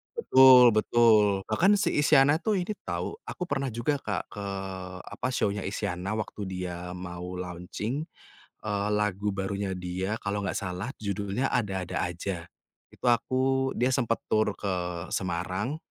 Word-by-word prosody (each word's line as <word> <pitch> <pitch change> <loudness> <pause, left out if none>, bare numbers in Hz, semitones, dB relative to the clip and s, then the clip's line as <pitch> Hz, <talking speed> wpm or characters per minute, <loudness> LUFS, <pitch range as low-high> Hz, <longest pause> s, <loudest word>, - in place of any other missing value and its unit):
Betul 130 - +8
betul. 110 0 +5 0.2
Bahkan 190 - +4
si 205 - +1
Isyana, 145 0 +5
tuh, 210 +3 0
ini 185 +4 -3
tahu - - -3
aku - - -4
pernah 135 0 0
juga, 140 +5 0
Kak, 105 -6 -3
ke 100 -1 -6 0.6
apa, - - -4
show-nya 100 -4 0
Isyana, 95 0 -3
waktu 110 -1 -5
dia 90 -1 -5
mau 90 0 -6
launching, 90 - -4 0.6
eee, 105 -1 -1
lagu 105 -1 0
barunya 100 0 -2
dia 95 +4 -3
kalau 100 0 -2
enggak 95 - -2
salah 95 +3 -4
judulnya 100 +4 -2
Ada-Ada 95 -6 -1
Aja, 90 +1 -4 0.5
itu - - -7
aku 130 +3 +2
dia 125 +2 +2
sempet 115 -4 +1
tur 110 -1 +1
ke 90 -3 -3
Semarang, 95 - -2
105 Hz, 140 wpm, -28 LUFS, 95-125 Hz, 0.6 s, Betul